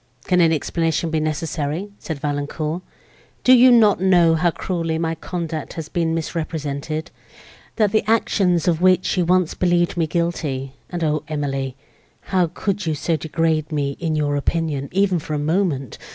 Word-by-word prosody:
"Can 180 -1 +2
any 165 -1 +4
explanation 165 +1 -1
be 160 - +1
necessary?" 155 +4 -2
said 160 - -5
Valancourt, 150 +3 -3 0.6
"do 255 - +7
you 255 0 +7
not 215 -6 +5
know 175 -3 +5
how 165 +2 +2
cruelly 165 -1 -2
my 165 0 -1
conduct 165 -1 -5
has 160 -2 -6
been 165 -2 0
misrepresented? 155 -2 -4 0.6
that 210 -3 +2
the 215 - +2
actions 185 -6 +2
of 170 -1 +2
which 185 0 +3
you 180 -2 +1
once 180 -1 +2
believed 175 -1 +1
me 165 -2 +1
guilty 150 -6 -2 0.2
(and, 175 -2 -3
O 155 -1 +1
Emily! 135 -3 -3 0.6
how 180 -2 +4
could 200 0 -2
you 155 - 0
so 165 +3 0
degrade 160 0 -1
me 140 -2 -1
in 165 -2 -1
your 145 -1 0
opinion, 145 -2 -1
even 190 -1 +2
for 155 0 -4
a - - 0
moment!) 150 - -1
165 Hz, 165 wpm, -21 LUFS, 150-180 Hz, 0.6 s, do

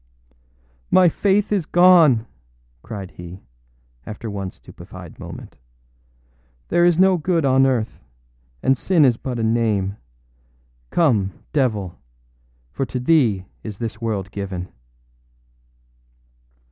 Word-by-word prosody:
âMy 180 -2 +5
Faith 200 +3 +1
is 190 -7 0
gone!â 170 -10 +5 0.6
cried 100 - -8
he, 90 +2 -11 0.6
after 110 +1 -7
one 100 -2 -4
stupefied - - -13
moment. - - -10 1.1
âThere 175 +1 +4
is 175 -2 +3
no 190 0 +4
good 165 -1 0
on 135 0 +4
earth; 120 -4 -1 0.6
and 135 - +2
sin 170 -6 +3
is 125 -3 +3
but 125 -1 -5
a 115 - -2
name. 110 -4 0 0.9
Come, 105 - +2 0.2
devil; 110 - -1 0.7
for - - -3
to 130 -1 -4
thee 125 - +2 0.2
is 105 -3 -7
this 115 0 -5
world 100 -4 -3
given. 95 -3 -5
120 Hz, 110 wpm, -21 LUFS, 100-160 Hz, 1.1 s, âMy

